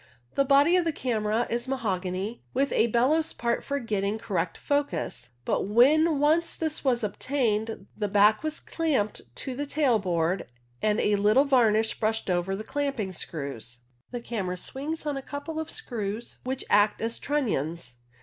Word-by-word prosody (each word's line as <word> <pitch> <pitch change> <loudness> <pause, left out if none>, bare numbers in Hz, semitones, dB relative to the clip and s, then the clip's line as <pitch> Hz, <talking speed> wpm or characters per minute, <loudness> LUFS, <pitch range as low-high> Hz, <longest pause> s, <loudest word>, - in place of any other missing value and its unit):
The 275 - +3
body 280 +5 +5
of 360 - +3
the 330 - +1
camera 230 -4 0
is 240 +2 -2
mahogany, 195 -4 -2
with 275 +2 +2
a 230 - +3
bellows 270 +8 +2
part 235 0 -1
for 280 - -2
getting 210 -4 -1
correct 180 -6 -2
focus, 285 - -2 0.2
but - - 0
when 295 +9 +5
once 315 +3 +2
this 315 -1 -2
was 250 -4 +1
obtained 220 -2 -1
the 210 - -1
back 210 +2 +4
was 310 0 -1
clamped 285 -11 -1
to 260 -2 -4
the 290 +2 -3
tail 275 -6 +2
board 175 -1 0 0.3
and 215 -1 +2
a 205 0 +2
little 215 +7 +4
varnish 225 -5 +3
brushed 220 -2 0
over 180 +2 0
the 210 - -5
clamping 275 -8 -2
screws. 135 -7 -6 0.3
The 245 -1 -5
camera 195 -7 -3
swings 300 - -5
on 290 -2 -1
a - - -4
couple 285 +4 -5
of 320 - -4
screws, 230 - -5
which 260 +1 -3
act 205 +1 +4
as 225 +1 -2
trunnions. 170 - -2
235 Hz, 165 wpm, -27 LUFS, 205-280 Hz, 0.3 s, body